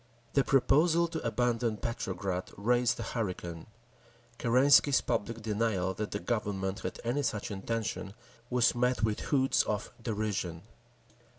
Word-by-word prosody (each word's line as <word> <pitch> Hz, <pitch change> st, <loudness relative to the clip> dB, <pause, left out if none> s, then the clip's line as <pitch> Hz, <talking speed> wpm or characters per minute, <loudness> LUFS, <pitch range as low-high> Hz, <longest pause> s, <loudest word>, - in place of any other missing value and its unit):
The 140 Hz, -, +4 dB
proposal 155 Hz, +6 st, +4 dB
to 160 Hz, -1 st, -4 dB
abandon 120 Hz, -1 st, 0 dB
Petrograd 95 Hz, -5 st, -3 dB
raised 120 Hz, +3 st, +2 dB
a -, -, -2 dB
hurricane; 90 Hz, -7 st, -4 dB, 0.7 s
Kerensky's 135 Hz, +3 st, +5 dB
public 115 Hz, +2 st, -2 dB
denial 105 Hz, -4 st, 0 dB
that 105 Hz, +2 st, -4 dB
the -, -, -2 dB
Government 100 Hz, -4 st, -2 dB
had -, -, -5 dB
any 120 Hz, +5 st, 0 dB
such 105 Hz, -6 st, -2 dB
intention 105 Hz, 0 st, -3 dB, 0.3 s
was 125 Hz, -1 st, +3 dB
met 125 Hz, 0 st, +1 dB
with 110 Hz, -1 st, +1 dB
hoots 135 Hz, -2 st, +2 dB
of 105 Hz, -1 st, -3 dB
derision. 100 Hz, -7 st, -2 dB
115 Hz, 125 wpm, -31 LUFS, 100-125 Hz, 0.7 s, Kerensky's